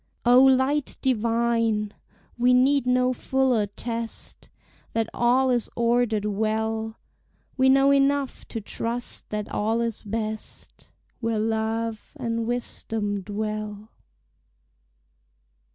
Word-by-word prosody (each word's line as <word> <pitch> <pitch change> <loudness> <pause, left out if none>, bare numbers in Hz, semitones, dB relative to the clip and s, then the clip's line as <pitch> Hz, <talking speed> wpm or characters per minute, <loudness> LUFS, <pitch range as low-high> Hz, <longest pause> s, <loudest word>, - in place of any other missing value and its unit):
O 245 +2 +7
Light 265 +2 +3
divine! 230 -3 +1 0.4
we 250 +1 +4
need 265 +1 +3
no 250 0 +3
fuller 255 -4 +1
test 230 +2 -5 0.4
That 225 -1 0
all 255 +2 +3
is 240 -2 +1
ordered 235 -3 +1
well; 220 +1 -1 0.6
We 260 0 +4
know 270 +1 +5
enough 280 0 +1
to 225 - -4
trust 235 +3 -4
that 210 -1 -3
all 220 +2 0
is 230 -2 -2
best 215 0 -6 0.3
Where 230 -2 -1
love 220 0 -2
and 230 -2 -2
wisdom 220 -4 -2
dwell. 215 +1 -5
230 Hz, 105 wpm, -25 LUFS, 220-250 Hz, 0.6 s, O